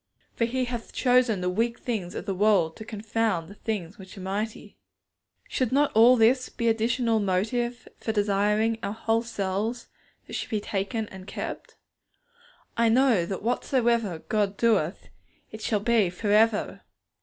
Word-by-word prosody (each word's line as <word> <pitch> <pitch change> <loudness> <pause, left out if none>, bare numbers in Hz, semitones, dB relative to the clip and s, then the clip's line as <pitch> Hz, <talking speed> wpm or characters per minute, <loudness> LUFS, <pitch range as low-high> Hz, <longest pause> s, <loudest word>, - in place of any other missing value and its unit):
For 230 - +1
He 255 +2 -1
hath 240 -2 -6
chosen 245 -6 +3
the 180 - 0
weak 230 +5 0
things 205 -8 -4
of - - -5
the 195 - -1
world 190 -5 +2
to 220 - -9
confound 215 -5 -2
the - - -10
things 205 -4 -5
which 190 +1 -12
are - - -7
mighty. 205 +4 -4 0.7
Should 255 -4 -1
not 285 +2 +3
all 235 +3 +7
this 250 +3 +3
be 235 - -2
additional 230 0 +1
motive 225 +5 -1
for 220 - -2
desiring 210 +1 +2
that 225 0 -6
our 200 - -3
whole 225 +1 0
selves 220 +1 -3 0.4
should - - -5
be 215 - 0
taken 205 +2 -3
and 190 0 -11
kept? - - -6 1.0
I 230 -1 +3
know 230 -7 +3
that 190 0 -5
whatsoever 235 - 0
God 205 -2 0
doeth, 210 -7 +1 0.4
it 220 - -9
shall 215 -1 0
be 225 -4 +3
for 205 +4 -3
ever. 215 0 +2
220 Hz, 160 wpm, -26 LUFS, 200-235 Hz, 1.0 s, all